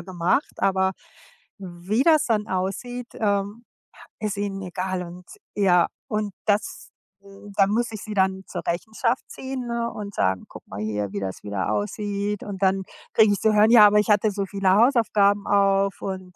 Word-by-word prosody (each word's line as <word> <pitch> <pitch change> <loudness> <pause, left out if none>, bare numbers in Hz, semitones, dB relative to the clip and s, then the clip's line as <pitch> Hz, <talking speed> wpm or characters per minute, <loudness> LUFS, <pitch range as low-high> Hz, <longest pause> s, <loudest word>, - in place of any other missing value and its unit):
gemacht“, 180 - -1
aber 190 -1 +2 0.7
wie 190 +5 -2
das 310 -2 +4
dann 215 -3 0
aussieht, 235 +7 -3
ähm, 205 +2 -1 0.6
ist 210 -2 -2
ihnen 200 -1 -3
egal. 185 0 -3
Und, 175 +1 -11 0.3
ja, 180 -4 +4 0.2
und 210 -4 -2
das 210 0 -1 0.3
hm, 200 +1 -14
da 195 - +6
muss 230 +3 0
ich 215 - -6
sie 215 - -6
dann 190 -1 +1
zur - - -6
Rechenschaft 220 +7 -1
ziehen, 265 -1 -6
ne, 235 0 -2
und 210 -2 -7
sagen: 95 0 0
„Guck - - -13
mal 95 - -8
hier, 105 -2 -3
wie 100 - -2
das 95 -1 -5
wieder 100 -1 -2
aussieht.“ 200 - -2
Und 200 -2 -7
dann 190 0 +2 0.3
kriege 215 -2 +5
ich 200 - -2
zu 220 - +2
hören: 210 +1 +5
„Ja, 215 -3 +9
aber 210 +1 +4
ich 210 - 0
hatte 210 +1 +3
so 200 0 -2
viele 195 -1 0
Hausaufgaben 210 -3 +3
auf 195 -1 +2
und 185 -2 -6
200 Hz, 175 wpm, -24 LUFS, 185-215 Hz, 0.7 s, Ja